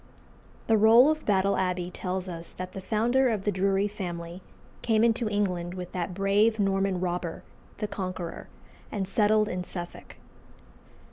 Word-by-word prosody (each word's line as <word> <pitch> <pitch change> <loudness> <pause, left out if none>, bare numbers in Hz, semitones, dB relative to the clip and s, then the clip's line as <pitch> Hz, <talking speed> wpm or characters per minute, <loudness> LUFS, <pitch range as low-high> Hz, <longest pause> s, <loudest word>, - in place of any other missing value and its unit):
The 225 - +4
Roll 230 +7 +7
of 310 0 -4
Battle 200 -1 +3
Abbey 180 -1 -1
tells 185 +1 -4
us 170 -2 -8
that 185 0 -7
the 190 - -6
founder 240 +6 +2
of 215 -4 -1
the 205 - +1
Drury 195 +1 +1
family 175 -3 -6 0.4
came 225 -1 +2
into 230 -1 +2
England 180 -4 -1
with 180 -1 -6
that 180 0 -3
brave 205 +3 +3
Norman 195 -2 +1
robber, 175 -2 -3 0.3
the 210 - -2
Conqueror, 185 -4 -5 0.4
and 195 -3 -2
settled 215 +1 +3
in 180 -2 -3
Suffolk. 175 -1 -8
195 Hz, 150 wpm, -27 LUFS, 180-215 Hz, 0.4 s, Roll